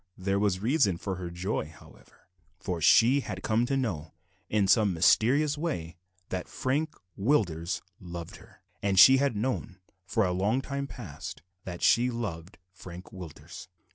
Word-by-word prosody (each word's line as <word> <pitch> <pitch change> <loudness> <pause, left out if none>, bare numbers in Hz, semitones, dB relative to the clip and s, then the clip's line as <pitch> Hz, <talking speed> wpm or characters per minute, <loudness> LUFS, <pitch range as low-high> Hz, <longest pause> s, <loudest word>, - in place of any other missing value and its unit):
There 95 +1 0
was 100 -2 +1
reason 115 - +2
for 95 +1 -4
her 90 -2 -5
joy, 85 -1 -3
however, 80 - -18 0.3
for 90 -3 -4
she 120 - +6
had 95 -8 -6
come 115 +2 +1
to 135 - 0
know, 85 - -3 0.3
in 105 -2 +2
some 105 -2 +4
mysterious 140 - +3
way, 90 - -3 0.3
that 90 -1 -4
Frank 150 +4 -2 0.2
Willders 90 - 0 0.2
loved 85 -2 -8
her; - - -19 0.2
and 100 -1 0
she 130 +5 +9
had 140 -3 +1
known, 110 -4 -2 0.3
for 110 -3 +1
a 90 - 0
long 100 +7 +1
time 140 +1 -4
past, 95 - -9 0.2
that 90 -2 -6
she 120 +2 +4
loved 100 -7 -5 0.2
Frank 90 -1 -11
Willders. 85 -1 -10
100 Hz, 155 wpm, -28 LUFS, 90-125 Hz, 0.3 s, she